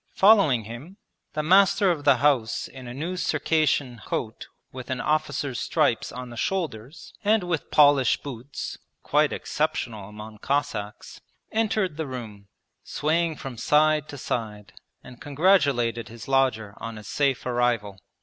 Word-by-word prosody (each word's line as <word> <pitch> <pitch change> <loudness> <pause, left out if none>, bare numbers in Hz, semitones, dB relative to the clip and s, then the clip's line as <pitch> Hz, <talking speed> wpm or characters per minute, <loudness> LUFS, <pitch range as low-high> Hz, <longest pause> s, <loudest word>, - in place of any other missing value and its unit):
Following 190 - +5
him, 120 - -10 0.4
the 155 0 -2
master 195 +3 +5
of 150 -4 -4
the 140 -2 +6
house 125 -4 +1
in 130 -2 -11
a - - -6
new 160 +8 -4
Circassian 145 -7 0
coat 110 -2 -4 0.2
with 130 -1 -9
an 130 -1 -2
officer's 150 -2 -1
stripes 145 -8 0
on 125 -1 -8
the - - -9
shoulders 150 - -4
and 210 -1 +3
with 175 -4 -3
polished 145 -4 +4
boots 130 0 -7 0.2
(quite - - +2
exceptional 105 -4 -3
among 105 0 -10
Cossacks) 135 -7 -3 0.3
entered 215 -7 0
the 160 -2 -3
room, 110 -6 -8 0.4
swaying 160 +2 0
from 130 -5 -8
side 150 +2 +3
to 145 - -7
side, 105 -5 -4 0.3
and 125 -1 -13
congratulated 140 -8 +2
his 115 -1 -11
lodger 130 -6 +1
on 115 -1 -7
his 105 -3 -10
safe 135 +6 0
arrival. 120 -5 0
135 Hz, 140 wpm, -25 LUFS, 115-155 Hz, 0.4 s, the